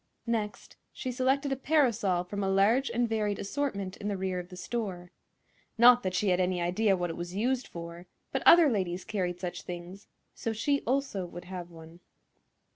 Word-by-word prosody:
Next 220 -3 -3
she 255 - -4
selected 265 +3 +1
a - - +2
parasol 235 - +2
from 200 +3 -4
a 195 - 0
large 215 +8 +3
and 235 +1 +1
varied 210 -3 -1
assortment 200 -5 -3
in 205 - -5
the 200 -1 -1
rear 185 -1 -2
of 180 0 -8
the 180 - -10
store. 180 -4 -4 0.7
Not 245 +1 +8
that 185 -3 -2
she 195 +2 +1
had 180 0 +2
any 180 -1 +1
idea 190 +3 +2
what 175 -1 -2
it - - -6
was 175 +1 -6
used 250 +4 0
for; 170 +1 -9 0.2
but - - -1
other 340 -2 +8
ladies 185 -7 -1
carried 180 -4 -2
such 180 -2 -4
things, 180 +3 -8 0.3
so 225 - -3
she 280 +6 0
also 255 -8 -1
would 175 +1 -9
have 180 -1 -7
one. 165 0 -13
195 Hz, 190 wpm, -29 LUFS, 180-240 Hz, 0.7 s, Not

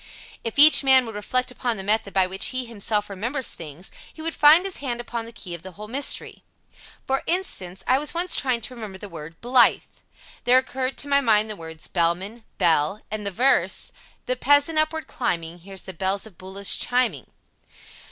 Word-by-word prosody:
If 230 - -5
each 300 +1 +8
man 265 -2 +6
would 225 - -7
reflect 250 +5 -1
upon 240 -2 -2
the 190 - -5
method 210 0 0
by 190 -1 +3
which 190 +1 -1
he 255 -1 -2
himself 210 -2 -2
remembers 235 +7 -3
things, 165 +2 -9 0.2
he - - -19
would 330 0 -3
find 310 +5 +6
his 390 - -2
hand 245 -4 -4
upon 235 -1 -5
the 230 - -10
key 185 -6 -9
of 170 - -7
the 190 +1 -11
whole 210 +4 -9
mystery. 270 +6 0 0.6
For 270 0 0
instance, 195 - -2
I 260 +1 +3
was 300 - -1
once 350 +2 0
trying 255 -4 0
to 240 - -5
remember 215 -5 -8
the 205 - -9
word 165 -2 -10
"Blythe." 245 +1 +4 0.6
There 250 +1 +6
occurred 260 0 -1
to 285 - -4
my 280 0 +3
mind 215 -3 +2
the - - -5
words 160 -2 -9
"Bellman," 190 +7 -1
"Belle," 170 +2 +2
and 210 -1 -4
the - - +1
verse: 250 +8 +2 0.2
" - - -32
the 255 - 0
peasant 285 +5 +3
upward 310 +1 -1
climbing 170 -7 -3
Hears 190 +1 -8
the 190 - -8
bells 190 +4 -1
of 215 -5 -14
Buloss 190 +2 -1
chiming." 245 - 0
225 Hz, 200 wpm, -23 LUFS, 190-260 Hz, 0.6 s, each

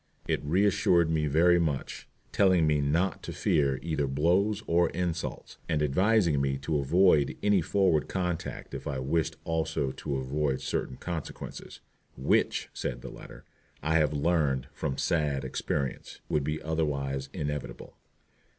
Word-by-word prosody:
It - - 0
reassured 85 0 +3
me 80 -1 +1
very 85 +4 +4
much, 75 -5 -3 0.2
telling 95 -4 +4
me 75 -1 +2
not 85 +7 0
to - - -6
fear 70 -3 +1
either 80 -4 -1
blows 90 +10 +1
or 85 +1 +3
insults, 85 -2 -4
and 75 -2 +1
advising 85 0 +3
me 70 0 0
to 75 +2 -1
avoid 75 +1 +3
any 100 -2 +4
forward 90 -3 +2
conduct 90 -3 -3
if - - -6
I 70 - -2
wished 70 +5 0
also 80 -4 -1
to 70 +1 -4
avoid 65 +1 -1
certain 65 - -3
consequences, 85 -4 -7 0.4
"which," 65 - +1
said - - -4
the - - -7
writer, - - -12 0.4
"I 80 +1 +2
have 75 -3 +3
learned 75 -4 +1
from 65 - -3
sad 75 -5 0
experience," 65 0 -3
would 75 - +1
be 75 +2 -2
otherwise 70 -4 -2
inevitable. 75 -5 -5
75 Hz, 140 wpm, -29 LUFS, 70-85 Hz, 0.4 s, very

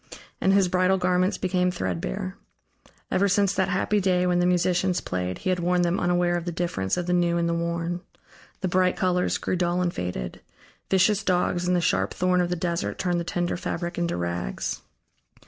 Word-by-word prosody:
And 190 - +3
his 195 -1 +4
bridal 185 +1 +2
garments 185 +1 +1
became 180 -1 +1
threadbare. 90 - -3 0.8
Ever 200 +2 +3
since 200 0 +3
that 190 -1 0
happy 195 +3 +1
day, 180 -2 +2
when 180 -1 +2
the 175 - +3
musicians 180 0 +2
played, 90 0 -3
he 185 - -1
had 180 - 0
worn 175 +1 +2
them 175 +2 +1
unaware 175 0 +2
of 170 - -5
the 175 - -2
difference 165 - -1
of 180 - -1
the 180 - 0
new 175 -1 +2
and 170 0 +1
the 170 - 0
worn. 170 +1 -2 0.6
The 190 - 0
bright 185 0 +2
colors 180 -2 +1
grew - - -2
dull 175 0 0
and 180 -1 0
faded; 90 -9 -4 0.5
vicious 195 +2 +3
dogs 180 -1 +1
and 180 - +3
the 175 - +2
sharp - - 0
thorn 180 0 +2
of 175 - 0
the 180 - 0
Desert 170 0 -2
turned 180 -2 0
the - - -2
tender 175 +1 -2
fabric 175 -1 -4
into 170 - -1
rags. 85 -6 -3
180 Hz, 200 wpm, -25 LUFS, 170-185 Hz, 0.8 s, his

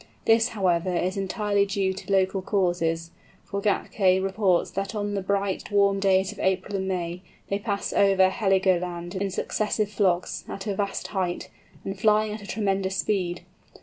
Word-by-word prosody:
This, 225 0 +5
however, 180 -2 +1
is 185 +2 0
entirely 200 +1 0
due 195 -1 0
to 195 +1 -8
local 190 0 +2
causes, 175 -4 0 0.3
for 200 0 -4
Gätke 195 -2 +2
reports 195 -2 +1
that 195 +2 -3
on 205 -1 -2
the 200 - -1
bright 195 0 -1
warm 200 -1 +3
days 190 0 +3
of 210 - -12
April 190 +2 0
and 190 -1 -2
May 175 -1 -3 0.3
they 200 - 0
pass 200 -1 -2
over 195 -1 +5
Heligoland 185 -4 +1
in 195 0 -1
successive 210 +2 -1
flocks, 185 -4 0
at 195 - -6
a 205 -2 -1
vast 200 0 -2
height, 185 -3 -2 0.3
and 195 0 -4
flying 215 0 +3
at 215 - -7
a 200 - -10
tremendous 195 -2 -1
speed. 180 -4 -1
195 Hz, 165 wpm, -26 LUFS, 185-200 Hz, 0.3 s, This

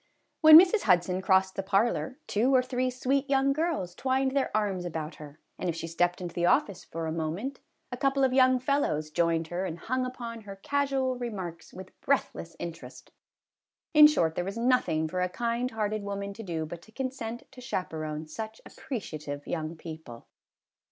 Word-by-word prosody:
When 310 0 +11
Mrs. 380 +4 +4
Hudson 180 -1 +2
crossed 190 0 +3
the - - -1
parlor, 215 +7 0
two 245 +6 +2
or 255 - +5
three 255 0 -1
sweet 265 +3 -1
young 275 0 +3
girls 305 - -1
twined 265 +3 0
their 275 0 +1
arms 200 -4 -1
about 160 -2 -5
her, 150 0 -12 0.2
and 185 - -1
if 165 - -2
she 165 - -5
stepped 175 +2 0
into 175 -2 -6
the 175 0 +1
office 200 0 +2
for 165 0 -5
a 160 - -2
moment, 165 - -3 0.3
a 245 - -4
couple 275 0 +1
of 260 -1 +3
young 255 -1 +5
fellows 250 - 0
joined 165 0 +1
her 175 +2 -2
and 170 -3 -4
hung 255 +9 -2
upon 235 -2 -6
her 200 -2 -9
casual 265 +2 -1
remarks 190 -8 -6
with 185 0 -10
breathless 265 -11 -1
interest. 170 -1 -8 0.8
In 300 -1 +10
short, 165 - +1
there 175 - -2
was 195 +4 -5
nothing 230 -11 +2
for 180 +3 -2
a 180 - +1
kind 235 +4 -1
hearted 215 -2 -2
woman 200 0 -4
to 225 - -9
do 165 -6 -3
but 170 +2 -8
to 220 - -18
consent 245 -2 -5
to 260 -1 -12
chaperon 160 -9 -4
such 220 +8 -7
appre 275 -5 -5
ciative 150 -7 -7
young 160 -1 -3
people. 160 -8 -10
200 Hz, 185 wpm, -28 LUFS, 170-255 Hz, 0.8 s, When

